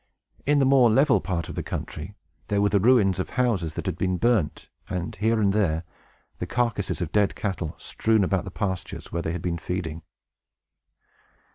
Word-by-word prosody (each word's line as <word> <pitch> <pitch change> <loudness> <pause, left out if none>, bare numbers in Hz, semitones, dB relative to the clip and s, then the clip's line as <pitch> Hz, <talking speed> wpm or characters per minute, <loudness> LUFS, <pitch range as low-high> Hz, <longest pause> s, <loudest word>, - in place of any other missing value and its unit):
In 145 0 +4
the 140 - +4
more 130 -3 +6
level 135 +4 +4
part 85 -4 -2
of - - -6
the - - -3
country, 85 +7 -6 0.3
there 100 - +1
were 100 0 +3
the 100 0 +3
ruins 100 -4 +4
of 95 - -2
houses 110 - 0
that - - -4
had - - -3
been 95 -1 +1
burnt, 105 -5 +1 0.2
and, 90 -1 -3
here 110 +3 +2
and 100 -2 +3
there, 85 -6 +1 0.6
the - - -3
carcasses 115 -6 -1
of 85 - -5
dead 105 -2 +2
cattle, 90 -6 -3
strewn 110 -2 +1
about 95 0 +1
the 100 - -6
pastures 95 -2 -4
where 85 - -1
they 80 - -2
had 85 -1 -4
been 85 -1 -1
feeding. 80 -2 -4
100 Hz, 185 wpm, -25 LUFS, 90-110 Hz, 0.6 s, more